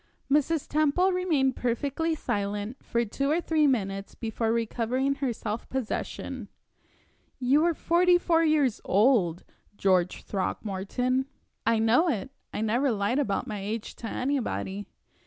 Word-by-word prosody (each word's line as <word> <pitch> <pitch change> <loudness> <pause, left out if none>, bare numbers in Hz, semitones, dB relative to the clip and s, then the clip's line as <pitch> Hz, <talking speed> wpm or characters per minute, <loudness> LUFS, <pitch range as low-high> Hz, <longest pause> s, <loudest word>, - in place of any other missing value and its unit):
Mrs. 300 +1 +2
Temple 310 +5 +2
remained 315 -8 +1
perfectly 280 +7 -1
silent 205 -1 -3
for 235 0 0
two 275 +6 -2
or 315 +3 +2
three 315 -3 +2
minutes 195 -6 -1
before 225 0 -2
recovering 235 +4 0
her 265 -3 +1
self 220 0 -5
possession. 260 -1 -4 0.9
"You 270 +4 +3
are 340 -1 +2
forty 350 +3 +4
four 330 -2 +2
years 300 -7 +2
old, 195 -5 +3 0.3
George 185 -2 +2
Throckmorton." 215 +7 -1 0.4
"I 230 0 +4
know 230 +10 +4
it. 265 -1 -2 0.2
I - - -3
never 240 +6 +2
lied 210 +5 0
about 205 -9 0
my 210 -1 -5
age 210 +3 -4
to 230 - -6
anybody." 225 -7 -2
250 Hz, 135 wpm, -27 LUFS, 210-290 Hz, 0.9 s, forty